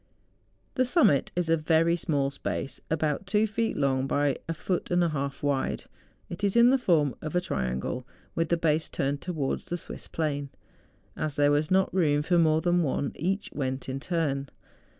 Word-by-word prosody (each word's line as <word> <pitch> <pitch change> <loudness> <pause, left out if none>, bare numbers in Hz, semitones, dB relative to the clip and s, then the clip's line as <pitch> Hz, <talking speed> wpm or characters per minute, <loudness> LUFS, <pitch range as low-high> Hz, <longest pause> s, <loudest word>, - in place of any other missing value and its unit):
The 255 - +2
summit 250 - +3
is 175 -1 0
a 165 - +4
very 165 +2 +2
small 145 -5 0
space, 135 -1 -4
about 155 +3 -1
two 210 +2 +3
feet 220 +1 -1
long 135 -1 +1
by 145 -1 +1
a - - +1
foot 180 +3 -2
and 175 0 +3
a 170 - +2
half 140 -2 -4
wide. 140 -2 0 0.4
It 175 +4 -7
is 200 +1 +2
in 235 +1 +7
the 270 - +3
form 155 - +2
of 155 +3 -5
a - - +5
triangle, 65 - -3 0.3
with 165 -1 -1
the 170 - +2
base 160 -1 +1
turned 140 +1 -2
towards 155 -7 -2
the 175 - -3
Swiss - - -8
plain. 145 -3 -2 0.7
As 150 -2 -2
there 145 0 +4
was 150 +1 +1
not 190 0 +2
room 150 -5 +2
for 175 +2 +2
more 160 -1 +3
than 175 0 +2
one, 140 -2 -1
each 195 +5 -2
went 130 -2 -3
in 135 +1 -3
turn. 140 -4 -1
155 Hz, 190 wpm, -27 LUFS, 140-175 Hz, 0.7 s, in